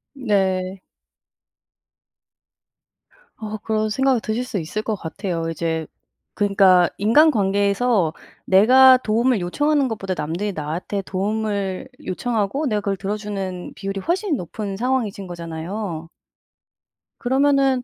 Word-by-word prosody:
네. 190 -6 0 2.6
어 215 0 -5
그런 215 0 -1
생각이 265 +2 +2
드실 220 +3 -2
수 250 -5 -3
있을 180 +6 -4
것 220 - -2
같아요. 170 -2 -4
이제 160 -1 -2 0.5
그러니까 195 -3 +4
인간관계에서 205 - +3 0.3
내가 255 +7 +7
도움을 235 0 +1
요청하는 285 +10 +1
것보다 195 -5 -3
남들이 170 +7 -2
나한테 170 +5 -4
도움을 200 +2 -2 0.2
요청하고 230 +7 -1
내가 210 -4 0
그걸 200 -1 -2
들어주는 195 -2 -4
비율이 195 0 -4
훨씬 350 - 0
높은 195 +2 -5
상황이신 225 -4 -1
거잖아요. 170 +1 -5 1.1
그러면은 270 0 +2
205 Hz, 270 characters per minute, -21 LUFS, 185-245 Hz, 2.6 s, 내가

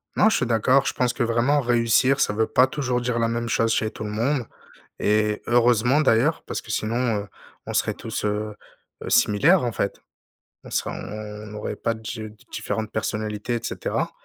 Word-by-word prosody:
Non, 220 - +5
je 220 - +2
suis 125 - 0
d'accord. 125 +4 +3
Je - - 0
pense 125 -1 0
que 120 - -1
vraiment 120 +5 +2
réussir, 120 +2 +3
ça 105 - +2
veut 110 +1 +1
pas 130 +1 +4
toujours 130 -3 -1
dire 120 -1 -1
la 115 - +2
même 115 0 -2
chose 115 0 +1
chez 110 -1 0
tout 110 - -7
le 105 - -4
monde, 120 +4 0 0.5
et 105 0 +1
heureusement, 120 +3 +4
d'ailleurs. 140 +2 +3
Parce - - -4
que - - -13
sinon, 115 0 0
heu, 100 - -12 0.4
on - - -4
serait - - +1
tous, - - -5
heu 105 0 -2 0.5
heu, - - -5
similaires, 140 - +4
en 120 - -1
fait. 100 -1 -2 0.7
On - - -11
serait - - -1
on 105 0 -7
aurait 105 - -4
pas 115 - -1
dje 110 0 -6
de 105 - -17 0.2
différentes 110 -1 -3
personnalités, 110 +2 -2
et 115 - -4
cetera, 115 - -2
115 Hz, 200 wpm, -24 LUFS, 110-125 Hz, 0.7 s, Non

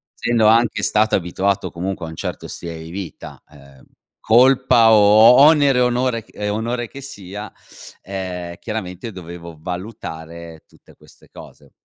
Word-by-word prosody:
essendo 115 -2 +1
anche 115 +1 +3
stato 110 0 +2
abituato 95 +2 -1
comunque 90 0 -5
a - - -7
un 80 - -9
certo - - -6
stile 85 -1 -7
di 80 - -10
vita, 95 -2 -9
ehm, 70 -2 -18 0.5
colpa 125 -1 +5
o 110 +4 +6
onere 145 -3 +5
e - - +3
onore 125 -2 0
ch - - -30
e 105 0 -4
onore 115 +3 -3
che 140 +4 -11
sia, 105 -6 -9 0.5
ehm, 90 -3 -6
chiaramente 110 0 -6
dovevo 85 -3 -10
valutare 85 -3 -8
tutte - - -22
queste - - -21
cose. - - -15
100 Hz, 145 wpm, -19 LUFS, 85-115 Hz, 0.5 s, o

